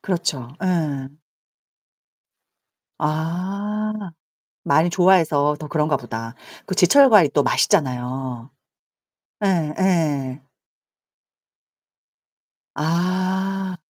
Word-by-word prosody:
그렇죠. 170 -9 -2 0.2
예. 150 -7 -1 1.9
아, 190 +7 -2 0.7
많이 160 +4 +3
좋아해서 165 -6 +3
더 155 - -8
그런가 150 -1 0
보다. 115 -1 -7 0.3
그 185 - -3
제철 235 +10 +6
과일이 180 -10 +6
또 145 - +3
맛있잖아요. 130 - -1 0.9
예예. 155 -6 0 2.3
아. 185 +3 -1
165 Hz, 140 characters per minute, -21 LUFS, 140-185 Hz, 2.3 s, 제철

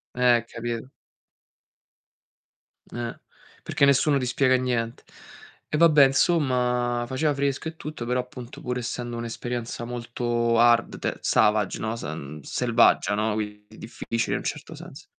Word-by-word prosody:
Eh, 125 -2 +4
capito. 120 +1 -5 2.0
Eh, 120 -1 -6 0.4
perché 140 - +2
nessuno 140 +1 +4
ti 130 - -1
spiega 130 +1 +3
niente. 120 -2 -2 0.6
E 150 - -1
vabbè, 150 -4 +7
'nsomma, 125 -5 +1
faceva 145 +3 0
fresco 140 +2 -1
e 160 - -6
tutto, 150 -6 -7
però 125 +1 0
appunto 125 -1 -10
pur 125 0 -3
essendo 120 0 -4
un'esperienza 120 0 -4
molto 120 -1 -1
hard, 120 0 +4
te - - -3
savage, 105 -2 +2
no? 110 +1 -2
S 115 - -8
mh, 75 0 -6
selvaggia, 115 - +2
no? 105 +1 0
Quindi 105 -1 -6
difficile 115 0 -3
in - - 0
un - - -9
certo - - -5
senso. - - -11
120 Hz, 140 wpm, -25 LUFS, 115-130 Hz, 2.0 s, vabbè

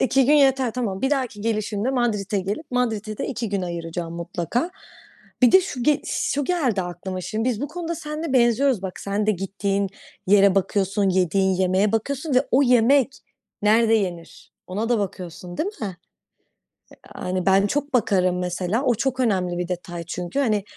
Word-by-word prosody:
2 265 0 +3
gün 295 - +5
yeter, 270 -4 +4
tamam. 215 -4 -3
Bir 265 - +1
dahaki 255 -7 -1
gelişimde 215 +1 -1
Madrid'e 215 -6 0
gelip 205 - -5
Madrid'e 220 -4 -1
de - - -2
2 235 -4 -3
gün 200 -1 -2
ayıracağım 170 -1 -5
mutlaka. 175 - -2 0.7
Bir 245 - +6
de 375 - +8
şu 275 -9 -5
ge 295 +3 +3
şu 285 0 -1
geldi 260 - 0
aklıma 180 +1 -5
şimdi. 220 +6 -2
Biz 235 -2 -1
bu 285 - -3
konuda 335 +1 -4
seninle 305 0 -5
benziyoruz. 245 -2 +3
Bak, 190 -2 -6
sen 200 +1 -1
de 215 - +4
gittiğin 195 +1 -1 0.4
yere 200 0 +5
bakıyorsun, 195 +1 +1
yediğin 190 +1 +2
yemeğe 190 +2 +2
bakıyorsun 280 +6 -1
ve 255 - +3
o 265 - +4
yemek 250 +1 +4 0.5
nerede 225 +2 +4
yenir, 180 -5 -3
ona 210 +5 -3
da 240 - +2
bakıyorsun, 180 -2 -6
değil 380 - -1
mi? 195 -4 -4 1.2
Yani, 185 0 -3
ben 195 +1 +4
çok 285 +5 -2
bakarım 185 -7 +2
mesela. 180 +7 -1
O 250 -3 +2
çok 260 +3 -1
önemli 185 -7 +1
bir 175 0 -2
detay 175 -1 -5
çünkü. 175 +9 -3
Hani, 215 -7 +1
210 Hz, 170 wpm, -23 LUFS, 185-255 Hz, 1.2 s, de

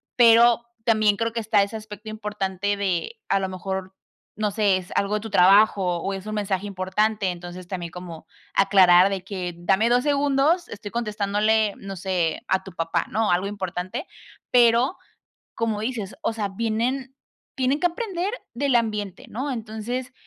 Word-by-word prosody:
pero, 235 0 +6 0.2
también 215 -3 +3
creo 230 0 -1
que 230 - -2
está 210 -2 +3
ese 200 +3 -5
aspecto 215 0 -10
importante 205 -2 -2
de 200 - -2
a - - +2
lo 190 -1 -2
mejor, 190 0 -5 0.4
no 210 -1 -1
sé, 200 -2 +2
es 185 -1 -9
algo 200 +1 +1
de - - 0
tu 220 0 -8
trabajo 200 +3 +5 0.2
o 195 +4 -3
es 195 +1 -7
un 215 - -3
mensaje 200 -1 -1
importante, 200 +1 0
entonces 175 +1 -9
también 175 -2 -5
como, 170 -2 -9 0.3
aclarar 185 -2 +6
de 195 -2 -3
que: 180 -3 -5
"Dame 195 +6 +2
2 245 +1 +3
segundos, 290 +4 +2
estoy 205 -1 -8
contestándole, 215 -1 +1
no 195 0 -7
sé, 180 -3 -1
a 190 0 +1
tu 190 - -10
papá", 165 -1 -1
¿no?, 220 -1 +1
algo 180 +3 +1
importante, 190 - -4 0.5
pero 240 +5 +4 0.6
como 225 -2 -1
dices 220 -3 -4
o 270 -8 -1
sea, 210 -2 -2
vienen 230 +6 -2 0.4
tienen 265 +3 0
que 355 - +3
aprender 365 0 -2 0.2
del 270 +1 +1
ambiente, 210 -1 -2
¿no?, 265 +6 -3
entonces 235 +2 -5
210 Hz, 165 wpm, -24 LUFS, 190-230 Hz, 0.6 s, pero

